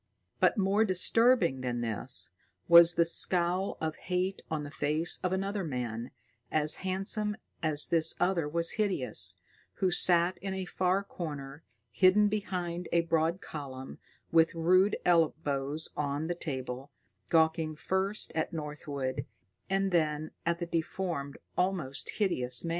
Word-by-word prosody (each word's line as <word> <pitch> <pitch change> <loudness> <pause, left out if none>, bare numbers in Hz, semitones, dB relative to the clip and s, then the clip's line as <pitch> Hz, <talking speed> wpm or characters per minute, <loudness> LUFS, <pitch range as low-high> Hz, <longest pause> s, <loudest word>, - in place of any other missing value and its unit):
But, - - +3
more 200 +2 +2
disturbing 190 - +3
than 120 -2 -3
this, 115 -3 0 0.4
was 170 0 +8
the 170 - +3
scowl 180 +2 +1
of 160 -1 -3
hate 185 +2 -2
on 155 -2 -3
the 145 - -8
face 155 +3 0
of 180 - -1
another 195 +1 -2
man, 120 -5 -4 0.4
as 155 0 -1
handsome 195 +3 -1 0.2
as 155 -2 +3
this 165 -1 +3
other 175 -5 0
was 170 +2 +4
hideous, 125 - +3 0.4
who 185 -1 0
sat 175 0 +4
in 190 +1 -4
a 190 -1 -4
far 185 +2 0
corner 145 -6 -7 0.3
hidden 185 - +4
behind 180 -4 -4
a 170 - +3
broad 165 +2 0
column, 135 -6 -8 0.3
with 165 0 +3
rude 185 +5 +3
elbows 155 -3 +1
on 145 +1 -2
the 175 - -2
table, 130 -5 -5 0.4
gawking 160 -1 +2
first 190 +6 -1
at 160 - -2
Northwood 150 -4 -5 0.4
and 195 0 0
then 155 -2 0 0.2
at 170 0 +1
the 175 - -4
deformed, 165 -3 -3 0.2
almost 180 -8 -2
hideous 125 - +1
man. - - -3
170 Hz, 135 wpm, -30 LUFS, 150-185 Hz, 0.4 s, was